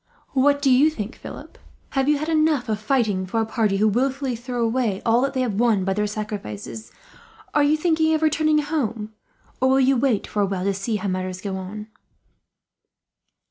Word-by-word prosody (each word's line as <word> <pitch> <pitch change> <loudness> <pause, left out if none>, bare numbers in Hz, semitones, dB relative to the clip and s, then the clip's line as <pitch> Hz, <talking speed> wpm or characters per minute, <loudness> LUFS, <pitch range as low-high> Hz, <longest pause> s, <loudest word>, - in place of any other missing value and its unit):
"What 285 +1 +3
do 270 - +4
you 270 +5 +5
think, 225 -7 -6
Philip? - - -11 0.3
Have 270 +1 +1
you 300 - +4
had 305 +2 -4
enough 310 -5 +2
of 215 -1 -1
fighting 215 -5 0
for 225 +5 -1
a 225 - +1
party 220 -3 0
who 215 +2 +3
wilfully 260 +3 0
throw 240 0 -2
away 225 -4 0
all 230 +1 +3
that 275 +1 -1
they 260 - +1
have 220 -5 -1
won 225 -6 +2
by 195 - +1
their 210 +1 0
sacrifices? 115 - -6 0.6
Are 295 - +3
you 290 +2 +3
thinking 320 -1 +2
of 315 - -1
returning 310 0 +3
home, 235 -8 -2 0.5
or 260 - +4
will 265 +1 +4
you 270 +1 +4
wait 245 -4 +1
for 210 - -2
a 200 - +2
while, 190 -1 -3
to 200 +1 +1
see 200 +4 -2
how 205 -1 -3
matters 185 -1 -3
go 195 0 -4
on?" 195 +3 -6
235 Hz, 200 wpm, -23 LUFS, 205-275 Hz, 0.6 s, you